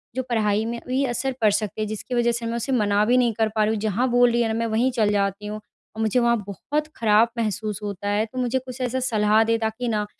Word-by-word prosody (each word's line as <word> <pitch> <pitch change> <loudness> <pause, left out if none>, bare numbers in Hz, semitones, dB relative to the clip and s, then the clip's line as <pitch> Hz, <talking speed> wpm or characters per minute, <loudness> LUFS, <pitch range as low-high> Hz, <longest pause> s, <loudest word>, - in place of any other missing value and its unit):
जो 260 - -1
पढ़ाई 215 -2 +1
में 235 0 -4
भी 260 +2 0
असर 260 +2 -2
पड़ 215 -2 +5
सकता, 215 +1 -2
जिसकी 215 +4 -5
वजह 235 0 +2
से 235 0 -3
मैं 230 +1 -2
उसे 265 +4 -3
मना 210 -4 +2
भी 245 +2 +3
नहीं 240 -3 +2
कर 220 0 0
पा 215 - +3
रही 215 +1 +1
हूँ। 215 - -2
जहाँ 220 +4 0
बोल 245 0 +4
रही 235 0 +1
है 230 - +1
ना 220 - -1
मैं 230 - 0
वहीं 235 +4 +1
चल 220 -4 +1
जाती 200 0 -1
हूँ, 215 0 -5 0.4
और 220 - -4
मुझे 220 +3 +2
वहाँ 235 0 +3
बहुत 295 +9 -3
खराब 220 +1 +4
महसूस 215 -1 -2
होता 205 0 -4
है। 210 +2 +1
तो 255 +3 -12
मुझे 250 +1 0
कुछ 255 0 -9
ऐसा 255 +1 -1
सलाह 220 -3 +3
दें 230 0 +1
ताकि 220 +2 -2
ना 210 -2 0
225 Hz, 265 wpm, -23 LUFS, 210-245 Hz, 0.4 s, पड़